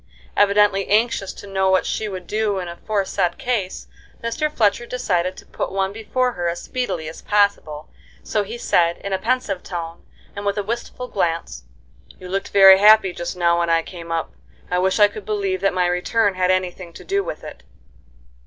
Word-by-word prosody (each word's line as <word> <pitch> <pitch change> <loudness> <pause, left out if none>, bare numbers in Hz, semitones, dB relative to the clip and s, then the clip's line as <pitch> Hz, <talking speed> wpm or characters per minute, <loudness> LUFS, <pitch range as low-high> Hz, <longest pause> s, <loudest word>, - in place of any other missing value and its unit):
Evidently 200 -1 +3
anxious 215 -2 +1
to - - -11
know 190 -1 0
what 190 -1 +3
she 215 - -2
would 185 -2 -7
do 210 +1 -1
in 180 -2 -4
aforesaid 190 0 -2
case, 230 -8 -2 0.4
Mr. 230 +7 -1
Fletcher 230 -2 +1
decided 185 -7 -1
to - - -12
put - - -4
one 195 0 -1
before 250 +4 -1
her 175 -6 -3
as 170 - -4
speedily 245 -11 -3
as 160 - -8
possible, 200 -7 0 0.4
so 210 - 0
he 215 +4 -6
said, 170 -6 +2
in 200 - -5
a 190 - 0
pensive 230 -6 -1
tone, 170 -2 -6 0.3
and 200 - -5
with 200 0 -1
a 205 - 0
wistful 235 +3 -5
glance: 165 - -2 0.5
"You 185 - -10
looked 195 +2 -2
very 195 -1 +8
happy 210 -2 +6
just 175 +1 -5
now 170 -1 +2
when 170 0 0
I 165 0 +3
came 170 -2 -9
up. 165 -1 -2 0.4
I 180 - +2
wish 190 +1 +1
I 205 - +8
could 205 0 -9
believe 195 -2 -2
that 195 - +2
my 180 -1 +1
return 190 +4 +1
had 185 0 0
any 185 -1 +1
thing 175 -2 -12
to - - -11
do 395 +1 0
with 155 - -6
it." - - -10
195 Hz, 195 wpm, -21 LUFS, 180-210 Hz, 0.5 s, very